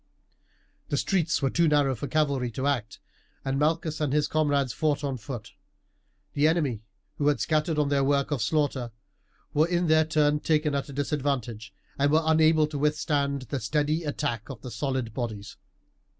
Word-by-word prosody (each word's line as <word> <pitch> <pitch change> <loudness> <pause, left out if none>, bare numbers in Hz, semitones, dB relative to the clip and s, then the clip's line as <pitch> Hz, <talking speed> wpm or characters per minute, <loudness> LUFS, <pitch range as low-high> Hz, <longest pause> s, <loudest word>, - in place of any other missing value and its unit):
The - - 0
streets 165 -6 0
were 135 - +2
too 170 -1 +3
narrow 145 -3 +3
for 130 +4 -5
cavalry 140 -5 0
to 130 - -3
act, 120 -7 -1 0.5
and 135 0 0
Malchus 155 +1 0
and 150 -3 0
his 150 0 +2
comrades 145 -5 +1
fought 145 +3 0
on 140 -2 -1
foot. 120 -2 -7 0.8
The 145 +2 +3
enemy, 150 -9 0 0.4
who 145 - +1
had 145 -4 +2
scattered 155 +4 0
on 150 -1 +2
their 140 -1 +2
work 140 +1 +1
of 140 -5 0
slaughter, 135 -1 0 0.6
were 155 +3 +3
in 175 0 +1
their 160 -1 +4
turn 150 -1 +2
taken 150 -1 +1
at 140 +1 -2
a - - -8
disadvantage, 135 -6 -2 0.3
and 145 +1 +3
were 160 +1 +3
unable 160 0 +4
to 150 -1 -5
withstand 145 -2 0
the 130 +2 -4
steady 150 +7 0
attack 145 -7 -3
of 125 -4 -9
the 125 - -7
solid 125 -1 -2
bodies. 110 -4 -5
145 Hz, 175 wpm, -27 LUFS, 135-155 Hz, 0.8 s, their